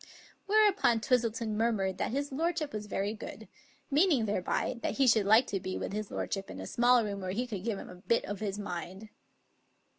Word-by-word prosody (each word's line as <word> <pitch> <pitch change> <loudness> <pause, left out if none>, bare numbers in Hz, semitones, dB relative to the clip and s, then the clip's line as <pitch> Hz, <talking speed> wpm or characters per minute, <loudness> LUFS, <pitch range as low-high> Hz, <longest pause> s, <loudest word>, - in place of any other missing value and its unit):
Whereupon 400 - +4
Twistleton 230 -2 0
murmured 210 -4 0
that - - 0
his 280 +3 -2
lordship 315 +1 -1
was 210 0 -5
very 205 +1 -1
good, 220 - -9 0.4
meaning 295 - +4
thereby 210 +4 -1
that - - -2
he 275 - +4
should 220 -5 +4
like 220 +4 +6
to 195 - -2
be 185 0 -4
with - - -4
his 215 -1 -3
lordship 195 -1 -3
in 95 - -8
a 95 - -6
small 240 - +4
room 200 -1 -4
where 185 - -4
he 225 +7 -1
could 205 -7 -5
give 225 -3 -1
him - - -8
a - - -9
bit 190 +6 0
of 205 0 -5
his 205 -2 -3
mind. 190 +1 -6
220 Hz, 205 wpm, -31 LUFS, 195-250 Hz, 0.4 s, like